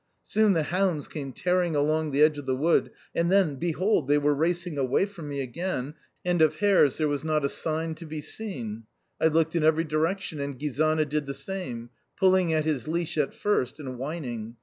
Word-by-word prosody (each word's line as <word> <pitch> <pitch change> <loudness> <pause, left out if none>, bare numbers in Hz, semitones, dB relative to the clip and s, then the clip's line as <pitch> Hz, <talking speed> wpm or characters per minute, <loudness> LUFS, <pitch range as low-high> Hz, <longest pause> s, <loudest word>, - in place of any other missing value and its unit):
Soon 215 -2 +3
the 165 -3 +1
hounds 175 -2 0
came 140 -4 -6
tearing 180 +3 0
along 155 +2 +1
the 145 +1 +3
edge 155 -1 +4
of 145 - -9
the 130 - +1
wood, 160 +6 +2 0.2
and 170 +1 +1
then 190 -7 +3
behold, 175 +1 +1
they 145 +1 +4
were 145 0 +2
racing 170 +1 -1
away 135 +7 +2
from 175 -7 -9
me 140 -1 -3
again, 145 +1 -3 0.3
and 175 -2 +2
of 155 - +4
hares 195 -9 +4
there 155 - +1
was 145 0 -2
not 155 -2 +1
a - - +1
sign 160 +2 -2
to 160 +1 -10
be 155 0 -5
seen! 120 - -5 0.4
I - - +5
looked 160 +1 +1
in 165 - +2
every 160 +1 +4
direction 160 +2 -1
and 140 -1 -4
Gizana 155 +3 +1
did 150 0 -2
the 140 - -4
same 125 -13 -5 0.3
pulling 185 -2 +4
at 155 -1 +1
his 150 -6 -1
leash 170 +1 -1
at 150 -3 0
first 160 -9 0
and 130 -4 -6
whining. 125 -6 -5
155 Hz, 205 wpm, -27 LUFS, 140-170 Hz, 0.4 s, I